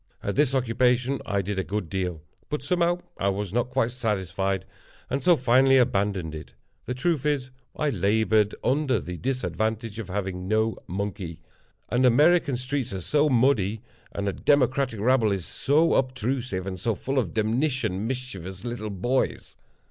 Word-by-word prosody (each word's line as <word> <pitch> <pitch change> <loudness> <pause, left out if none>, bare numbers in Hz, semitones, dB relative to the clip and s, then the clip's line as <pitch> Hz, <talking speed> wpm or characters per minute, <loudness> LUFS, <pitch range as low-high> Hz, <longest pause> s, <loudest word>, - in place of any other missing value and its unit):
At 100 - -2
this 140 -2 +2
occupation 125 +1 +1
I 100 -2 0
did 100 +1 -2
a - - 0
good 105 -2 -3
deal; 90 -4 -3 0.3
but, 150 -3 -3
somehow, 175 +3 +1 0.2
I 100 - +2
was 100 -1 -3
not 120 +1 0
quite 120 -1 +1
satisfied, 95 -5 -1 0.5
and 135 +2 0
so 175 -2 +5
finally 130 +1 +5
abandoned 100 -8 +1
it. 80 0 -9 0.3
The 125 - -2
truth 150 +1 0
is, 140 -4 -1 0.2
I 150 -1 0
labored 105 +1 +2
under 130 -3 +2
the 90 -1 -6
disadvantage 115 -3 -2
of 110 - -5
having 95 -1 -3
no 110 +2 +1
monkey—and 95 +5 -5
American 145 +2 +4
streets 130 0 -2
are 95 - -4
so 150 - +2
muddy, 115 -5 +2 0.3
and 100 0 -3
a 100 - 0
Democratic 130 -4 +2
rabble 115 -1 +3
is 95 -4 -2
so 150 - +2
obstrusive, 125 -6 -1
and 95 -2 -5
so 115 +4 0
full 135 +7 -1
of 120 - -3
demnition 110 -2 0
mischievous 95 -8 -6
little 120 -3 -4
boys. 120 +7 -1
115 Hz, 155 wpm, -26 LUFS, 100-130 Hz, 0.5 s, so